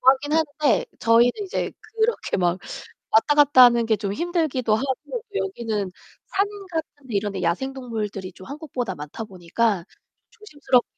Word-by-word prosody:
좋아하긴 270 +3 +4
하는데 300 -5 +2
저희는 230 +2 +5
이제 385 - -3
그렇게 450 +1 -1
막 180 -1 +1 0.5
왔다 260 +7 +4
갔다 290 -3 +7
하는 235 -1 +5
게 225 -1 +3
좀 200 -1 -3
힘들기도 310 - 0
하고 275 - -3
여기는 225 - -2 0.3
산 395 +1 +1 0.2
같은 305 -4 -5
데 220 - -4
이런 205 0 0
데 190 - -4
야생 185 +11 0
동물들이 210 -7 -5
좀 185 +1 -13
한국보다 265 - -4
많다 150 +9 -7
보니까 190 0 -1 0.4
좀 - - -26
조심스럽기도 290 - +1
245 Hz, 345 characters per minute, -24 LUFS, 205-295 Hz, 0.5 s, 갔다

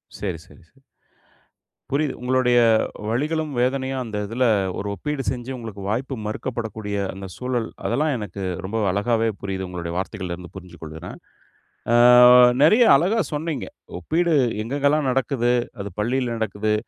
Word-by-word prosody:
சரி, 90 -5 -4
சரி, - - -18
சரி. 135 - -29 1.1
புரியுது. 140 0 0
உங்களுடைய 125 -1 +2 0.5
வலிகளும், 155 +5 -1
வேதனையும் 130 +1 0
அந்த 110 -3 -5
இதுல 125 +4 0 0.3
ஒரு 100 - -4
ஒப்பீடு 150 +1 -3
செஞ்சு 125 0 -5
உங்களுக்கு 110 -4 -8
வாய்ப்பு 130 +5 -2
மறுக்கப்படக்கூடிய 110 -2 -4 0.2
அந்த 95 +1 -8
சூழல், 125 -3 -2 0.2
அதெல்லாம் 150 +5 +1
எனக்கு 100 -3 -7 0.2
ரொம்ப 105 +4 -3
அழகாவே 115 +3 +1
புரியுது. 95 -1 -4
உங்களுடைய 85 -2 -5
வார்த்தைகள்ல 95 -2 -4
இருந்து 90 0 -12
புரிஞ்சு 90 -2 -11
கொள்ளுறேன். 80 +2 -8 0.8
ஆ - - +5 0.7
நெறைய 215 +11 +6
அழகா 190 +10 +2
சொன்னீங்க, 150 -2 -3 0.3
ஒப்பீடு 165 - +1 0.3
எங்கெங்கலாம் 140 +3 +1
நடக்குது? 125 -2 0 0.3
அது 100 0 -6
பள்ளியில 120 +1 0
நடக்குது, 110 0 -1
120 Hz, 130 wpm, -22 LUFS, 100-135 Hz, 1.1 s, நெறைய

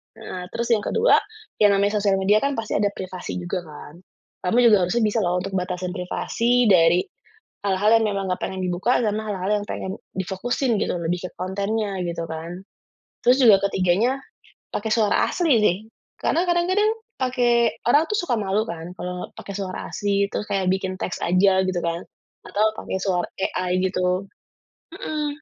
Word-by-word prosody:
Heeh, 180 -1 -7
terus 235 +3 -3
yang 220 - +5
ke-2, 455 - +3 0.4
yang 205 -2 +5
namanya 205 +1 +2
sosial 200 -1 +2
media 200 +3 +3
kan 280 +2 -1
pasti 225 -1 -4
ada 205 - +3
privasi 185 -1 -6
juga, 180 +1 -3
kan? 150 +2 -11 0.5
Kamu 230 - +2
juga 205 -6 +5
harusnya 230 +5 +1
bisa 215 +1 +1
loh 180 -3 +1
untuk 195 - -5
batasin 180 0 -3
privasi 230 +6 0
dari 175 0 +5 0.6
hal-hal 200 +2 +2
yang 225 - 0
memang 195 -1 -2
nggak 180 - -2
pengen 190 0 -4
dibuka, 185 +8 +1
sama 215 -1 -1
hal-hal 195 -2 -3
yang - - -6
pengen 190 - -4 0.2
difokusin 215 +6 -1
gitu, - - -1
lebih 175 +2 -2
ke - - -10
kontennya, 200 +2 -2
gitu 170 -1 -4
kan. 165 +3 -6 0.6
Terus 250 +2 +5
juga 200 -3 +7
ke-3-nya, 195 +9 +2 0.6
pakai 220 +2 -2
suara 215 -2 +3
asli, 335 -5 +1
sih. 185 -4 +3 0.4
Karena 350 +2 0
kadang-kadang 370 +5 +2 0.3
pakai 240 -2 +2
orang 295 +7 +4
tuh 425 - +1
suka 245 - 0
malu 200 +2 0
kan 170 -1 -6
kalau 180 0 -5
pakai 200 - -7
suara 190 -2 -5
asli, 200 -1 +1
terus 210 - -3
kayak 190 -2 +1
bikin 190 -1 -2
teks 185 - -4
aja, 190 +2 +3
gitu 180 -2 -1
kan? 170 +1 -1 0.5
Atau 210 +2 +1 0.2
pakai - - -4
suara 180 -2 0 0.3
AI, 185 0 0
gitu. 185 0 0 0.7
Mhm. 300 0 -4
195 Hz, 170 wpm, -23 LUFS, 180-225 Hz, 0.7 s, juga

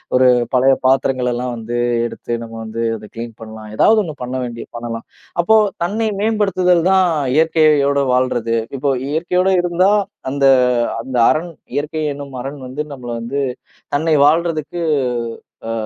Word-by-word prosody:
ஒரு 130 0 +5 0.3
பழைய 130 +1 +5
பாத்திரங்களலாம் 125 -2 +1
வந்து 115 +1 -4 0.3
எடுத்து 120 0 -5
நம்ம 115 0 -9
வந்து 110 +1 -5
அதை 105 -1 -10
கிளீன் 115 -1 -6
பண்ணலாம். 110 -1 -9
ஏதாவது 220 - +4
ஒண்ணு 155 -4 -6
பண்ண 125 +1 -4
வேண்டி 120 -1 -6
பண்ணலாம். 115 -1 -6 0.4
அப்போ 220 +5 +4 0.3
தன்னை 220 +5 -1
மேம்படுத்துதல் 195 -5 +2
தான் 190 -1 +5 0.3
இயற்கையோட 155 -3 +3
வாழ்றது. 120 -3 +1 0.2
இப்போ 140 +1 0 0.2
இயற்கையோடு 180 +4 +1
இருந்தா 180 +3 +2 0.4
அந்த 140 -1 +1 0.6
அந்த 130 0 -4
அரண் 170 +2 0 0.2
இயற்கை 155 +2 -2
என்னும் 140 -2 -9
அரண் 140 +2 -6
வந்து 140 +4 -4
நம்மல 120 -3 -7
வந்து 135 +5 -2 0.5
தன்னை 155 +1 +2
வாழ்றதற்கு 165 +1 +1 0.9
அ - - -1
140 Hz, 135 wpm, -18 LUFS, 120-170 Hz, 0.9 s, ஒரு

